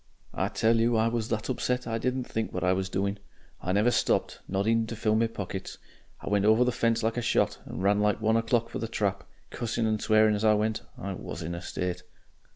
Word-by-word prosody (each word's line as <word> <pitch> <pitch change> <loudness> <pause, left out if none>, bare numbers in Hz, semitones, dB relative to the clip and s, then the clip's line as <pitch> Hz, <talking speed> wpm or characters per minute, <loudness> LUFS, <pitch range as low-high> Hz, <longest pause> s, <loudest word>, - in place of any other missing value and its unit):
"I - - 0
tell 115 +1 +2
you 115 0 +3
I 110 +1 +3
was 115 -1 -2
that 110 -1 -2
upset 125 0 -1
I 115 -1 -2
didn't 125 +2 -1
think 110 -2 -3
what 90 - -3
I 90 0 +3
was 95 0 -2
doing. 100 +2 -1 0.4
I 90 - -2
never 105 +5 +3
stopped - - +1
not 95 +1 -1
even 115 0 +2
to 115 - -5
fill 110 0 +1
my 115 +1 +3
pockets. 95 -3 -6 0.4
I - - -10
went 100 -1 +2
over 110 +3 +5
the 125 - +1
fence 115 -1 +1
like 115 +2 0
a - - +1
shot, 115 - +1
and - - -6
ran 100 +1 +3
like 105 0 +2
one 110 0 +2
o'clock 115 0 +1
for - - -5
the 115 - -3
trap, 100 -3 -1 0.3
cussing 115 -1 -2
and 110 -1 0
swearing 110 0 +4
as 105 +1 -2
I 110 -1 +5
went. 110 +1 0 0.2
I 100 0 -4
WAS - - -6
in 85 +2 -4
a 85 - -5
state.... 90 -1 -3
110 Hz, 240 wpm, -28 LUFS, 100-115 Hz, 0.4 s, over